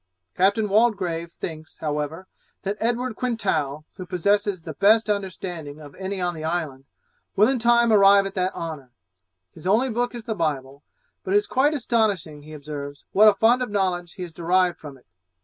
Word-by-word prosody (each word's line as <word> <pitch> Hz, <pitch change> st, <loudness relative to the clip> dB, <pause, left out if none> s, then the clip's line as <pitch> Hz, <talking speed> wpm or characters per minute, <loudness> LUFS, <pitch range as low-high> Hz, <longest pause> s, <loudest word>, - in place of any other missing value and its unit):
Captain 200 Hz, +4 st, +2 dB
Waldegrave 195 Hz, -6 st, +1 dB
thinks, 160 Hz, -2 st, -8 dB
however, 150 Hz, +3 st, -3 dB, 0.4 s
that 200 Hz, +1 st, -2 dB
Edward 240 Hz, +1 st, -1 dB
Quintal, 155 Hz, -, -2 dB
who 185 Hz, -, -6 dB
possesses 200 Hz, 0 st, 0 dB
the 160 Hz, -, -6 dB
best 215 Hz, +6 st, +4 dB
understanding 175 Hz, -6 st, -5 dB
of 145 Hz, -2 st, -12 dB
any 190 Hz, 0 st, -5 dB
on 175 Hz, -1 st, -1 dB
the 155 Hz, -2 st, -8 dB
island, 155 Hz, -5 st, -3 dB, 0.5 s
will 210 Hz, +2 st, +5 dB
in 260 Hz, -1 st, 0 dB
time 235 Hz, 0 st, +4 dB
arrive 200 Hz, -1 st, +6 dB
at 195 Hz, -, -5 dB
that 185 Hz, 0 st, -1 dB
honour; 155 Hz, -6 st, -6 dB, 0.6 s
his 160 Hz, -, -9 dB
only 235 Hz, +6 st, +2 dB
book 245 Hz, +2 st, -1 dB
is 235 Hz, -, -7 dB
the 225 Hz, -1 st, -3 dB
Bible, 140 Hz, -6 st, -3 dB, 0.4 s
but 190 Hz, -, -1 dB
it -, -, +8 dB
is 205 Hz, -, +1 dB
quite 285 Hz, +4 st, +2 dB
astonishing, 205 Hz, -, 0 dB
he 155 Hz, +1 st, -12 dB
observes, 145 Hz, -1 st, -8 dB
what 215 Hz, +2 st, +6 dB
a 210 Hz, -, +6 dB
fund 235 Hz, +5 st, +3 dB
of 250 Hz, -, -2 dB
knowledge 185 Hz, -4 st, -1 dB
he 185 Hz, -, -7 dB
has 170 Hz, -2 st, -8 dB
derived 175 Hz, +1 st, +1 dB
from 145 Hz, -3 st, -10 dB
it. 125 Hz, -, -25 dB
185 Hz, 185 wpm, -24 LUFS, 160-215 Hz, 0.6 s, it